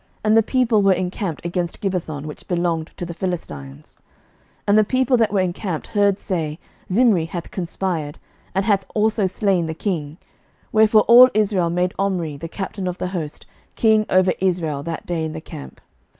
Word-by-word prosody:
And 215 +1 +3
the 225 - +7
people 235 -2 +2
were 195 -1 +5
encamped 180 -2 -3
against 175 0 -2
Gibbethon, 170 -8 -3
which 150 - -9
belonged 170 -3 -1
to 175 - -4
the 170 - -6
Philistines. 75 - -6 0.6
11:016:016 - - -43
And 205 - +5
the - - +5
people 255 +3 +2
that 225 -3 +2
were 200 -2 +2
encamped 180 -2 -3
heard 200 -2 +3
say, 160 -7 -3 0.3
Zimri 205 -5 +4
hath 170 +1 -6
conspired, 170 -4 -3 0.4
and 195 0 +1
hath 200 -3 +2
also 215 -1 +2
slain 190 -3 0
the 160 - -4
king: 160 -5 -3 0.5
wherefore 215 0 +5
all 245 +4 +8
Israel 200 -5 +2
made 180 +2 0
Omri, 180 -6 -1
the 160 +4 -6
captain 195 +1 -5
of 180 0 -3
the 180 - -3
host, 165 -5 -5 0.3
king 220 -1 +3
over 185 0 +4
Israel 170 -6 0
that 165 +2 -5
day 170 -2 -2
in 155 -1 -3
the 160 - -5
camp. 65 - -10
185 Hz, 180 wpm, -21 LUFS, 165-205 Hz, 0.6 s, all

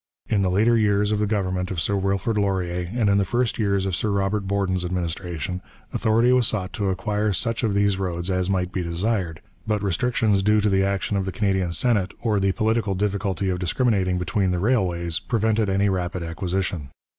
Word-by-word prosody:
In 100 - +2
the 95 - +2
later 110 +6 +3
years 105 -1 +2
of 105 - +1
the 105 - +1
government 95 -3 -1
of 95 - -3
Sir 100 +5 0
Wilfrid 100 +3 0
Laurier 90 -4 -1
and 115 -2 +1
in 100 0 +4
the - - +3
first 120 +4 -1
years 100 -2 +1
of 95 -3 -1
Sir 105 - -1
Robert 100 0 0
Borden's 95 -2 0
administration, 90 -1 -3 0.3
authority 115 +3 +3
was 125 -2 +3
sought 95 -4 -2
to 100 -4 -1
acquire 105 +2 0
such 115 +5 -1
of 105 -3 +1
these 100 -1 +2
roads 90 -1 -2
as 90 0 0
might 90 -2 0
be 95 -2 -2
desired, 85 -1 -2 0.3
but 105 -2 0
restrictions 105 +1 +1
due 105 +2 +3
to 105 0 +2
the 95 0 +3
action 100 +1 0
of 95 - -1
the 95 - -2
Canadian 95 -3 0
Senate 100 +1 +1
or 110 -4 +1
the 95 0 +2
political 110 -1 0
difficulty 100 -1 -1
of 90 -1 -1
discriminating 95 -1 +1
between 95 +2 0
the 90 - 0
railways 90 -6 0
prevented 110 0 0
any 100 +1 +2
rapid 90 -2 -2
acquisition. 90 -3 -3
95 Hz, 200 wpm, -23 LUFS, 90-105 Hz, 0.3 s, in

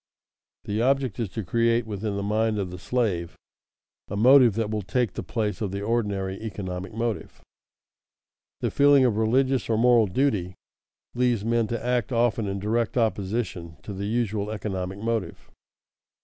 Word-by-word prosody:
The 105 +2 -2
object 135 0 +1
is 115 -5 -1
to 110 - -3
create 115 +4 +1
within 105 -1 -3
the 100 - -2
mind 110 +1 +1
of 95 -3 -3
the 90 - -8
slave 90 -4 -1 0.7
a 100 - -4
motive 125 -1 +6
that 110 -2 -1
will 105 -1 -1
take 100 +3 -1
the - - -4
place 110 0 -3
of 105 - -1
the 100 +1 -4
ordinary 100 -4 -1
economic 95 -3 -5
motive. 115 -1 -3 1.2
The - - 0
feeling 140 -2 +5
of 115 -4 +1
religious 130 +3 +1
or 110 - +2
moral 120 -1 +5
duty 95 -5 0 0.6
leads 120 -4 +1
men 115 -1 +1
to 115 +1 -4
act 125 +2 0
often 115 -2 +1
in 100 0 -2
direct 110 +4 -1
opposition 100 -6 -1
to 105 - -6
the 100 +1 -4
usual 110 -2 -1
economic 95 -3 -4
motive. 110 -4 -3
110 Hz, 160 wpm, -25 LUFS, 100-120 Hz, 1.2 s, motive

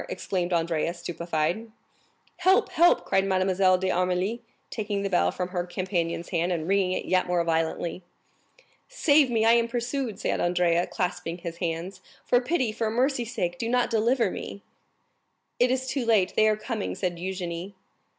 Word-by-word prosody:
exclaimed 185 - -2
Andrea, 170 0 0
stupefied. 170 +4 -2 0.7
"Help, 375 +1 +3
help!" 345 +2 +4
cried 190 0 +2
Mademoiselle 185 -1 +2
d'Armilly, 185 +4 0 0.3
taking 205 -2 -2
the 195 - -2
bell 175 - +3
from 180 0 -4
her 180 -1 -2
companion's 175 -2 -3
hand, 175 0 0
and 165 -2 -2
ringing 190 -1 +2
it - - -3
yet 185 0 +1
more 175 -1 +1
violently. 165 +1 -1 0.9
"Save 300 - +4
me, 225 -2 +1
I 225 - +6
am 235 0 +4
pursued!" 240 0 -3
said - - -1
Andrea, 175 -1 +2
clasping 175 -2 -3
his 170 -1 -7
hands. 175 +3 -4 0.2
"For 245 - +3
pity, 255 -4 0
for 220 0 -2
mercy's 245 0 0
sake 175 -5 -2
do 230 - -2
not 245 0 +1
deliver 230 -1 +2
me - - -6
up!" 200 - -16 1.0
"It 245 - +4
is 260 0 0
too 260 0 -2
late, 215 -5 +2
they 215 - +4
are 215 -1 +2
coming," 215 -1 -4
said 180 -3 -2
Eugénie. 180 +1 -5
190 Hz, 165 wpm, -26 LUFS, 175-230 Hz, 1.0 s, I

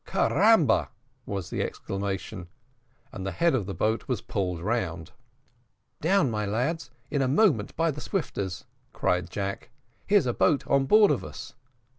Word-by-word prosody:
"Carambo!" 220 -8 +3 0.4
was 100 -4 -4
the - - -1
exclamation 95 -1 -4 0.6
and 95 - -7
the 95 - -2
head 170 -2 +2
of 110 -8 0
the 100 - -4
boat 110 +1 0
was 125 -5 -1
pulled 90 -4 -3
round. 90 -5 -2 0.9
"Down, 175 -5 +3
my 105 -1 -1
lads, 130 +9 -1 0.2
in 145 -2 +1
a 130 - +2
moment 140 - +2
by 165 0 +1
the 150 +1 -7
swifters," 100 - -3 0.3
cried 90 0 0
Jack. 100 +2 -4 0.4
"Here's 205 -6 +4
a 120 - 0
boat 145 +3 +2
on 135 -1 +2
board 210 +3 +6
of - - 0
us." - - -9
115 Hz, 155 wpm, -27 LUFS, 95-160 Hz, 0.9 s, board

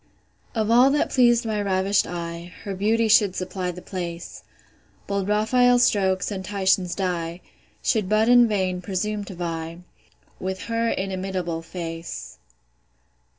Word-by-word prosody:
Of 220 0 0
all 245 +3 +6
that 290 +1 +1
pleas'd 240 -2 +4
my 215 -2 -1
ravish'd 195 0 +1
eye, 170 0 -6
Her 200 - -4
beauty 220 +4 +1
should 210 -3 +4
supply 185 0 -3
the 180 0 -7
place; 175 -2 -6 0.6
Bold 200 -1 -2
Raphael's 245 +4 +4
strokes, 190 -3 +2
and 190 -2 -4
Titian's 190 -2 +1
dye, 175 -3 -2 0.4
Should 210 -5 +1
but 215 +1 +3
in 245 -1 +7
vain 185 -4 -1
presume 205 +3 -2
to 190 - -9
vie 165 -1 -5 0.6
With 190 0 -4
her 230 0 0
inimitable 185 -4 -3
face. 165 -1 -7
190 Hz, 135 wpm, -24 LUFS, 180-215 Hz, 0.6 s, in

